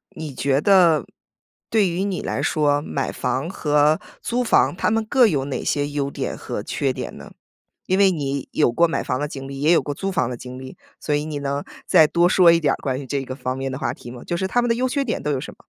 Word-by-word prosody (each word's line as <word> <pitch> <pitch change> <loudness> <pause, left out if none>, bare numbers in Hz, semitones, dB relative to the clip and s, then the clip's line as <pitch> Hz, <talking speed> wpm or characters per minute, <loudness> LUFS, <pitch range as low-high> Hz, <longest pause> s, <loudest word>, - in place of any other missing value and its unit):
你 155 -3 -6
觉 135 +2 +1
得 170 - +5 0.6
对 210 -5 +3
于 175 +3 -2
你 195 -3 -2
来 - - -3
说， 145 -2 +1
买 140 -3 -3
房 140 +6 -2
和 150 -3 +2 0.2
租 245 +1 -1
房 230 - +3
它 - - 0
们 225 0 0
各 250 0 +4
有 140 -7 0
哪 140 - -4
些 145 0 0
优 140 -1 -2
点 - - -4
和 - - -5
缺 - - -1
点 - - -6
呢？ - - -11 0.6
因 185 - +2
为 195 -1 +5
你 140 -5 -3
有 120 - +2
过 170 +7 +3
买 160 - -2
房 125 +1 -2
的 150 - -1
经 135 -2 -8
历， 135 0 -7
也 155 +3 +4
有 - - +4
过 145 - -4
租 195 +6 -3
房 130 -9 0
的 125 - -4
经 125 +1 -9
历， 130 0 -10 0.2
所 150 - -2
以 145 +1 0
你 150 -2 -4
能 140 0 -2 0.2
再 160 -5 +6
多 170 +2 +3
说 175 -3 +6
一 165 - +4
点 145 -3 +2
儿 - - -3
关 130 -1 -3
于 - - -8
这 135 +1 -2
个 130 0 -6
方 130 -1 -4
面 135 0 -3
的 130 - -4
话 - - -1
题 120 - -11
吗？ 120 -1 -10
就 175 - -2
是 190 - -1
它 245 +6 +1
们 240 - -1
的 230 - +3
优 255 +2 0
缺 280 +2 0
点 235 - -2
都 150 - -1
有 135 - 0
什 - - -7
么？ - - -24
150 Hz, 285 characters per minute, -22 LUFS, 135-185 Hz, 0.6 s, 再